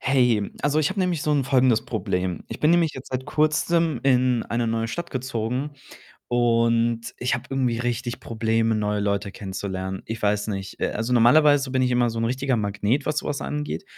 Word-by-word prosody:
Hey, 125 -6 +2
also, 145 +1 +2
ich 155 +3 +2
habe 195 - -2
nämlich 180 -5 0
so 150 - 0
'n 140 -2 +1
folgendes 130 -3 +3
Problem. 90 -4 -2
Ich - - -7
bin 155 - +4
nämlich 170 -2 +3
jetzt 130 - -9
seit 130 0 -3
Kurzem 155 +1 +1
in 125 -3 +3
eine 115 0 -1
neue 115 0 -1
Stadt 170 +8 -5
gezogen 130 +1 -3 0.6
und 115 -1 +2 0.2
ich 125 0 0
habe 120 0 -4
irgendwie 130 -4 0
richtig 120 0 -3
Probleme, 115 0 0
neue 105 -1 0
Leute 100 -1 -1
kennenzulernen. 95 -1 -5
Ich 115 0 -5
weiß 105 0 +1
nicht. 95 -2 -5
Äh, - - 0
also, 115 +3 -2
normalerweise 140 +3 +5
bin 130 -1 +2
ich 125 - +2
immer 120 -1 +2
so 115 - -5
'n - - 0
richtiger 130 +2 0
Magnet, 105 +5 -1
was 150 0 0
so - - -5
was 145 -1 -2
angeht 150 +6 -4
120 Hz, 195 wpm, -24 LUFS, 110-140 Hz, 0.6 s, normalerweise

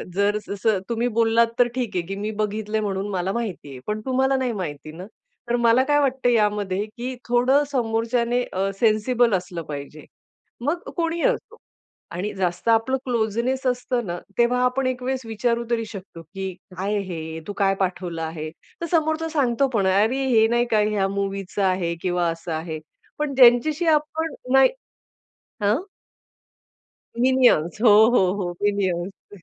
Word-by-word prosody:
जर 205 +1 +2
स - - -19
जसं 200 0 +1
तुम्ही 235 +1 0
बोललात 230 0 +4
तर 245 - +6
ठीक 240 -7 -3
आहे 180 - +1
की 195 - -4
मी 210 +2 -3
बघितलंय 215 +1 -2
म्हणून 195 -1 -2
मला 185 0 -1
माहितीये. 180 - -5
पण 210 0 -2
तुम्हाला 265 +1 +2
नाही 255 -2 -1
माहिती 155 -6 -5
ना, 180 +4 -9 0.4
तर 240 - +2
मला 235 +2 +4
काय 290 +2 +2
वाटतं 265 -3 +1
यामध्ये, 210 -3 +1
की 245 +4 -6
थोडं 255 +4 +3
समोरच्याने 235 0 0
अ, 195 +1 0
सेन्सिबल 230 +1 +3
असलं 180 -2 -4
पाहिजे, 145 +1 -8 0.6
मग 295 +7 0 0.2
कोणीही 335 0 -1
असो. - - -1 0.5
आणि 185 +5 -3
जास्त 180 +2 -2
आपलं 230 +4 +3
क्लोजनेस 235 +2 -1
असतं 250 -1 -1
ना, 175 0 -3 0.2
तेव्हा 245 +1 +3
आपण 255 +1 0
एक 255 -1 -2
वेळेस 260 0 -1
विचारू 235 +2 -1
तरी 230 -1 0
शकतो, 190 -5 -9
की 190 +4 -6 0.3
काय 195 +3 -1
आहे 200 - 0
हे, 160 0 -5
तू 205 - -4
काय 195 -1 +2
पाठवलं 180 -3 -2
आहे? 160 -1 -5 0.3
तर - - -1
समोरचा 315 0 +1
सांगतो 275 -4 +1
पण, 200 -3 +2
"अरे, 220 +8 +2
हे 225 -3 +4
नाही 240 +1 +2
का 215 -1 +4
या 210 -2 +1
मूव्हीचं 195 0 -3
आहे 185 -3 0
किंवा 175 -1 0
असं 165 +1 -7
आहे." 160 0 -4 0.4
पण 300 -2 -1
ज्यांच्याशी 265 +6 +5
आपण 315 +1 -4 0.2
नाही 270 0 +7 0.9
हं. 215 - +2 1.4
मिनिऑन्स, 245 -9 +3
हो, 235 - +6 0.3
हो, 185 -4 +4
हो. 180 -3 -2
मिनिऑन्स. 195 -1 -2
220 Hz, 160 wpm, -23 LUFS, 190-250 Hz, 1.4 s, नाही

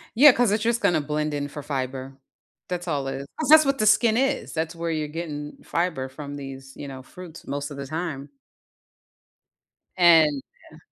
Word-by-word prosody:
Yeah, 285 +5 +9
'cause 245 -3 +2
it's 210 +1 0
just 235 0 +1
gonna 160 -3 +2
blend 150 +1 -2
in 145 0 -2
for 145 +1 -8
fiber. 135 -1 -4 0.5
That's 180 0 -4
all 145 -4 -1
is. 135 +1 -4
That's 310 - -1
just 310 0 +8
what 275 0 +1
the 215 - +2
skin 220 +2 +4
is, 270 +2 0
that's 160 +1 -2
where 165 0 -3
you're 155 -1 -2
getting 150 -2 -6
fiber 165 -7 -2
from 145 +1 -8
these, 135 -1 -9
you 145 - -8
know, 135 -1 -8
fruits 170 +2 -12
most 145 +2 -4
of 140 - -8
the 140 - -5
time. 155 -2 -4 1.7
And 160 -5 +5 0.3
Yeah. - - -15
155 Hz, 185 wpm, -24 LUFS, 140-180 Hz, 1.7 s, Yeah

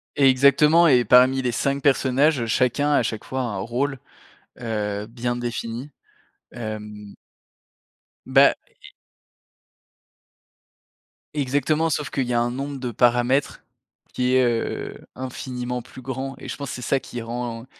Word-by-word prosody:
Exactement 140 +5 +5
et 125 -5 +4
parmi 130 +4 +5
les 125 -1 -1
5 140 +4 -1
personnages, 135 -1 +2
chacun, 125 +5 +1
a 145 - +3
chaque 110 -1 -4
fois, 130 0 -3
un 115 -6 -3
rôle, 125 +7 -2 0.6
heu, 105 -3 -3
bien 120 +1 -3
défini. 120 +2 -5 0.6
Hem 105 -3 -7 1.1
Bah - - +5
et - - -17 2.4
Exactement 145 +3 +1
sauf 145 -3 -2
qu'il 135 0 -1
y 125 - -2
a 120 - +2
un 120 - 0
nombre 140 +2 -5
de 125 -1 -3
paramètres 120 +4 +1 0.5
qui 125 0 0
est, 130 - +5
heu, 120 -2 -2
infiniment 125 -1 -5
plus 130 +1 -13
grand 130 +1 -5
et - - -9
je - - -4
pense, 140 -2 -5
c'est 125 - -6
ça 135 +3 +1
qui 120 -2 -7
rend 115 0 -5
125 Hz, 135 wpm, -23 LUFS, 120-135 Hz, 2.4 s, Exactement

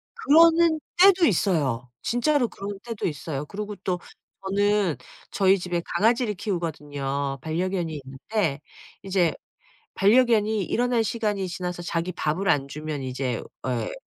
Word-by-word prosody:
그러는 330 -4 +5 0.2
때도 375 -2 +7
있어요. 145 - +1
진짜로 250 +2 +1
그런 200 -2 -7
때도 230 -3 -3
있어요. 150 -2 -4
그리고 205 +5 -6
또 180 -1 -1 0.4
저는 200 -3 +1 0.4
저희 195 -1 +4
집에 175 -2 -2
강아지를 230 +1 +2
키우거든요. 145 -7 -3
반려견이 165 0 -2
있는데 140 +4 -2 0.4
이제 185 -4 +1 0.6
반려견이 215 -1 +3
일어날 240 +3 +1
시간이 210 -4 -1
지나서 180 -1 -4
자기 170 +1 -2
밥을 175 +3 -1
안 140 -6 +2
주면 150 0 -5
이제 130 -2 -3 0.2
에 120 -4 -2
185 Hz, 295 characters per minute, -25 LUFS, 150-215 Hz, 0.6 s, 때도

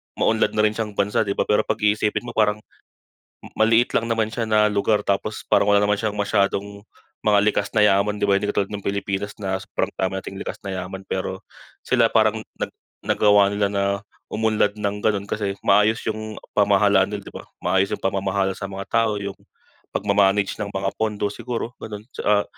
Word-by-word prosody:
maunlad 110 0 +2
na 105 - +3
rin 105 - +4
siyang 105 -3 -3
bansa, 105 +1 +1
'di 100 - -1
ba? - - +1
Pero 105 - +1
'pag - - -1
iisipin 105 +2 +1
mo 120 - -6
parang 105 -1 +1 1.0
maliit 115 +2 +4
lang 115 - +1
naman 110 -1 0
siya 115 -2 -2
na 105 0 +5
lugar, 105 +1 +1
tapos 100 +2 -1
parang 100 - +3
wala 100 - +5
naman 105 - +3
siyang 110 -2 -2
masyadong 100 0 0 0.4
mga 105 -1 +4
likas 105 -1 +1
na 105 - +6
yaman, 105 +1 +3
'di 105 - -1
ba. 100 -1 +3
Hindi 105 - -2
katulad 100 0 -1
ng 105 - -4
Pilipinas 100 0 -2
na 95 -2 -3
sobrang - - -3
dami 95 0 0
nating 95 0 -7
likas - - -5
na 100 - -4
yaman, 95 +1 -6
pero 95 0 -4 0.4
sila 120 -3 +3
parang 110 -1 +2 0.2
nag - - -4 0.3
nagawa 105 -1 +4
nila 100 0 +1
na 100 -1 0 0.5
umunlad 110 -1 +1
ng 105 0 -1
ganon 100 -2 +1
kasi 100 -2 -2
maayos 110 +2 +3
yung 110 0 -5 0.2
pamahalaan 100 -1 +4
nila, 105 - -4
'di - - -14
ba? - - -8 0.2
Maayos 95 +2 +1
yung - - -3
pamamahala 95 0 0
sa - - -6
mga 100 0 -5
tao, 115 -2 +2
yung 100 -1 -5 0.6
pagma-manage 100 0 +2
ng 100 -1 -3
mga 95 0 -1
pondo 105 -2 0
siguro 120 0 -4
ganun, 105 -1 -7
tsaa 105 0 +1
105 Hz, 190 wpm, -22 LUFS, 100-110 Hz, 1.0 s, na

